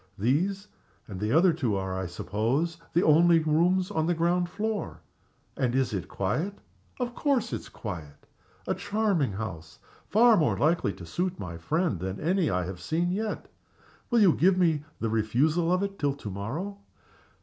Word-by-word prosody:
These 180 - 0 0.4
and 95 -3 -7
the 105 +2 -1
other 170 +3 +5
two 125 -10 -1
are, 95 -1 -2
I 95 -1 -3
suppose, 115 - -1 0.2
the 175 - +3
only 165 +2 +6
rooms 170 +4 +2
on 160 0 0
the 175 - +2
ground 175 +2 +1
floor? 215 +2 -3 0.5
And 125 -1 0
is 130 -3 +1
it 95 - -3
quiet? 155 - -2 0.4
Of 245 -1 -2
course 255 -5 0
it's - - -5
quiet! 80 -9 -8 0.4
A - - 0
charming 205 - 0
house. 90 -6 -6 0.3
Far 230 +1 +5
more 155 - +2
likely 155 -8 +2
to 90 -1 -10
suit 180 - -2
my 90 -3 -6
friend 155 - 0
than 95 +2 -4
any 175 +1 +1
I 90 -3 0
have 90 0 -7
seen 165 - 0
yet. 215 +3 -3 0.6
Will 235 -2 +4
you 185 -6 +6
give 185 +2 +3
me 165 -5 +2 0.2
the 115 - -1
refusal 140 +11 +1
of 185 +2 +2
it 200 0 -4
till 140 -1 0
to 110 -7 -7
morrow?" 155 - -5
160 Hz, 170 wpm, -27 LUFS, -, 0.6 s, only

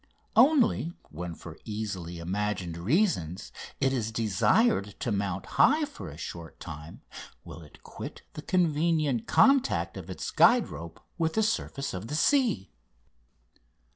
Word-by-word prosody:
Only 250 - +4 0.2
when 85 +2 -6
for 80 0 -11
easily 100 -6 -5
imagined 90 0 -2
reasons 95 - 0 0.3
it 135 0 +2
is 115 -4 -1
desired 110 - +2
to 120 - -1
mount 100 -2 -2 0.2
high 300 +5 +5
for 100 - -9
a 75 - -10
short 85 0 -8
time 75 0 -9 0.4
will 85 0 -10
it 75 - -16
quit - - -9
the 150 - -7
convenient 155 - +1
contact 275 -1 +3
of - - -8
its - - -5
guide 245 -1 +5
rope 85 0 -9 0.2
with 160 -1 0
the 220 - +3
surface 140 - -2
of 95 +4 -5
the 150 - -3
sea. 240 - +2
110 Hz, 140 wpm, -28 LUFS, -, 0.4 s, high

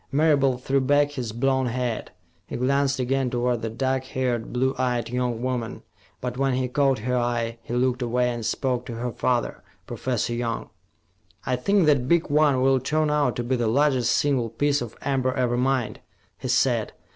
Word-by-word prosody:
Marable 140 -3 +3
threw 135 +2 0
back 145 +2 +3
his 125 -6 -4
blond 130 +2 +1
head. 120 -2 -2 0.4
He - - -6
glanced 140 +2 +1
again 130 +1 0
toward 120 -1 0
the 115 - -2
dark 130 +3 -1
haired, 125 -3 -2
blue 130 +2 +1
eyed 125 -3 0
young 125 -1 -2
woman, 125 -3 -3 0.4
but 125 0 -4
when 135 -2 +2
he 130 0 0
caught 135 0 +2
her 125 0 0
eye, 120 -1 -1
he 120 - -5
looked 125 0 +1
away 125 +1 +1
and 120 -1 -5
spoke 125 +2 -1
to 120 - -5
her 120 +1 -3
father, 120 0 -1 0.2
Professor 120 -2 -2
Young. 120 -1 -3 0.7
"I 130 - +1
think 195 +8 +2
that 140 -5 +3
big 170 -1 +2
one 145 -3 +3
will 135 0 +4
turn 150 +4 0
out 145 -4 +1
to 120 - -2
be 125 +2 0
the 120 -2 0
largest 130 0 +2
single 135 -5 +1
piece 145 +5 0
of 120 -2 -7
amber 130 -2 0
ever 125 -1 +1
mined," 130 -1 0 0.4
he - - -5
said. - - +1
125 Hz, 185 wpm, -24 LUFS, 120-135 Hz, 0.7 s, will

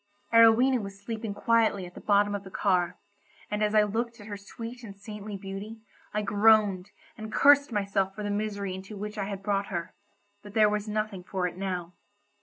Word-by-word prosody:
Arowhena 230 +3 +6
was 200 -1 -8
sleeping 220 0 -5
quietly 220 -3 +2
at 180 - -11
the - - -10
bottom 205 0 +3
of 200 -1 -3
the 190 - -10
car, 180 -2 +1 0.5
and 210 0 -1
as 210 0 +1
I 215 - +6
looked 230 +3 -2
at 205 - -11
her 205 -1 -6
sweet 230 +4 -9
and 200 -3 -10
saintly 210 0 -7
beauty, 195 +3 -7 0.3
I 210 0 -1
groaned, 205 -2 +4 0.3
and 215 0 -6
cursed 285 -1 +5
myself 195 -2 0
for 210 - -5
the 205 - -2
misery 205 -2 -2
into 190 +3 -8
which 210 +1 -5
I 195 - -1
had 195 -1 -6
brought 200 -1 0
her; 170 -4 -4 0.5
but 205 0 -13
there 215 -1 +6
was 210 0 -2
nothing 210 -3 -3
for 185 0 -2
it 180 - -3
now. 180 -2 -4
205 Hz, 200 wpm, -28 LUFS, 195-215 Hz, 0.5 s, Arowhena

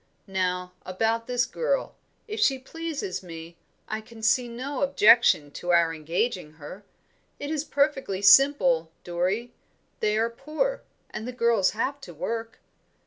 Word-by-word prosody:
Now 180 -2 -2
about 225 +5 -1
this 245 -1 +1
girl: - - -1 0.3
if 435 +1 -5
she 275 -11 +3
pleases 325 +6 -5
me, 165 -1 -10 0.3
I 215 0 -3
can 225 0 -14
see 240 +2 +3
no 255 +4 -5
objection 235 - +5
to 175 +4 -3
our 170 -1 +4
engaging 165 +2 -2
her. 160 +6 -11 0.6
It 285 +1 -4
is 310 -2 -1
perfectly 275 -10 0
simple, 195 - +5
Dorrie; 185 +7 -2 0.5
they 210 0 +1
are 230 +1 +1
poor, 310 - -2 0.3
and 220 +2 -6
the - - -3
girls 235 -5 +2
have 280 +5 -2
to - - -11
work. 230 0 -4
230 Hz, 140 wpm, -26 LUFS, 180-275 Hz, 0.6 s, objection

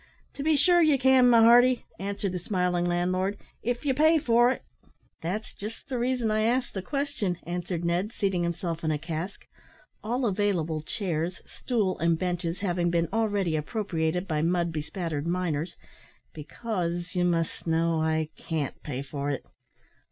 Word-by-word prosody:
"To - - -6
be 310 +2 +3
sure 345 +4 +5
ye 305 -4 +5
can, 260 -1 +5
my 230 -1 +7
hearty," 245 +2 +6
answered 200 0 -2
the 180 - -3
smiling 180 -1 0
landlord, 185 +3 0 0.2
"if 245 +4 -2
ye 270 - +3
pay 315 +4 +5
for 240 -4 +4
it." 260 - -2 0.6
"That's 195 +7 -4
just 215 +3 -8
the 255 -2 -2
reason 245 -2 0
I 215 0 +2
asked 245 +3 +1
the 190 - -3
question," 275 - -2
answered 175 0 -3
Ned, 175 +5 0
seating 195 -5 0
himself 170 -1 -2
on 160 - +1
a 155 - +1
cask 160 +4 -5 0.6
all 245 +4 -1
available 185 -7 0
chairs, 170 0 -3
stool; 215 -7 -1
and 165 0 +2
benches 175 0 -2
having 175 -3 +1
been 170 -1 +1
already 205 -7 +1
appropriated 175 0 -1
by 155 -3 0
mud 170 +1 +1
bespattered 155 0 -3
miners, 170 -2 -1 0.6
"because, 175 +1 -4
you 180 - +1
must 170 -1 -1
know, 165 0 +2
I 160 0 0
can't 155 -4 -4
pay 135 -2 -4
for 140 0 -4
it." 140 - -3
180 Hz, 160 wpm, -27 LUFS, 165-225 Hz, 0.6 s, my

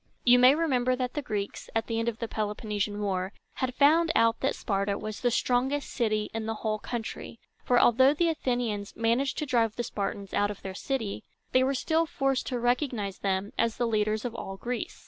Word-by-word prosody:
You 245 0 +6
may 255 +3 +7
remember 255 -6 +1
that 250 -1 -3
the 295 - -2
Greeks, 205 -6 -4
at 225 - +1
the 225 -1 -2
end 230 +1 +1
of 225 - -6
the 230 - -3
Peloponnesian 210 -1 -2
War, 190 -1 -1 0.2
had 255 -1 -2
found 320 +4 +5
out 230 0 +3
that 270 - 0
Sparta 200 -1 -1
was 215 -1 -6
the 245 - +3
strongest 260 +4 0
city 215 -4 0
in 225 -1 -3
the 225 - -2
whole 215 -1 0
country; 230 0 -6 0.2
for, 245 -1 +3
although 260 +3 +6
the 335 +2 +2
Athenians 245 -9 -2
managed 235 +4 +1
to 305 - -1
drive 230 -5 +1
the 240 - -2
Spartans 200 -2 -4
out 205 0 +2
of 205 - -8
their 190 - -5
city, 225 -1 -3 0.3
they 255 - +4
were 270 +1 +1
still 320 +5 +1
forced 270 -3 0
to 250 -2 -2
recognize 240 -5 -1
them 195 +1 -1
as 230 -1 +1
the 240 - +1
leaders 215 0 0
of 240 - -3
all 195 -4 -6
Greece. 245 +4 -4
230 Hz, 205 wpm, -28 LUFS, 210-255 Hz, 0.3 s, may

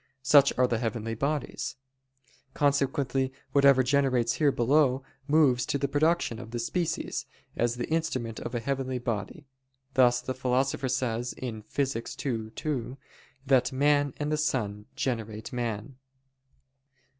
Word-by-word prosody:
Such 140 0 +6
are 125 - +5
the 120 -2 0
heavenly 115 -1 -2
bodies. 140 +6 -2 0.8
Consequently 135 -2 +1 0.2
whatever 140 -2 +5
generates 130 -2 +2
here 150 -3 +3
below, 135 +1 +2 0.2
moves 145 -5 +4
to - - 0
the 140 0 0
production 145 -4 +1
of 115 - -9
the 120 - -4
species, 165 +8 -2 0.3
as 120 0 +1
the 120 - -3
instrument 130 -8 -2
of 120 - -5
a - - 0
heavenly 130 0 -2
body: 120 - -4 0.5
thus 125 -2 +5
the 130 +1 -4
Philosopher 130 +1 0
says 120 -1 -1
(Phys. 115 +2 -3
ii, 115 -5 -2
2) 130 0 -4 0.5
that 130 -2 +3
"man 145 +1 +2
and 150 0 -2
the 155 - +1
sun 105 -8 -1
generate 110 -4 -3
man." 120 +1 -3
130 Hz, 135 wpm, -28 LUFS, 120-140 Hz, 0.8 s, Such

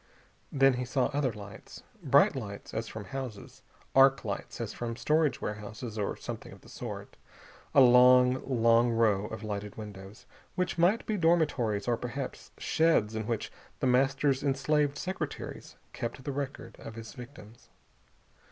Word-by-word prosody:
Then 135 -1 +4
he 125 0 -2
saw 130 +2 0
other 140 -3 +1
lights. 105 0 -11 0.2
Bright 140 -2 +4
lights, 100 -6 -7
as 115 0 -3
from 105 -1 -7
houses. 125 -1 -7 0.3
Arc 135 -1 +5
lights 100 -2 -5
as 115 -3 -4
from 115 -1 -4
storage 150 +2 +1
warehouses, 105 +2 -6
or 105 -2 -2
something - - -7
of - - -14
the - - -16
sort. - - -7 0.6
A 140 - +8
long, 125 0 +6
long 115 -2 +3
row 110 -3 +2
of 110 0 -7
lighted 105 -1 -5
windows, 100 -1 -10 0.3
which 180 -1 -1
might 185 +7 +3
be 215 - -1
dormitories 145 - +1
or 120 -1 +2
perhaps 125 +3 -6
sheds 160 -10 +2
in 110 -1 -4
which 115 -3 -2 0.3
The - - -1
Master's 135 +2 +2
enslaved 145 +1 +1
secretaries 185 +5 -5 0.2
kept 120 +3 -5
the 140 - -3
record 140 0 -5
of 110 - -9
his 115 -1 -9
victims. 120 -3 -13
125 Hz, 150 wpm, -30 LUFS, 110-140 Hz, 0.6 s, A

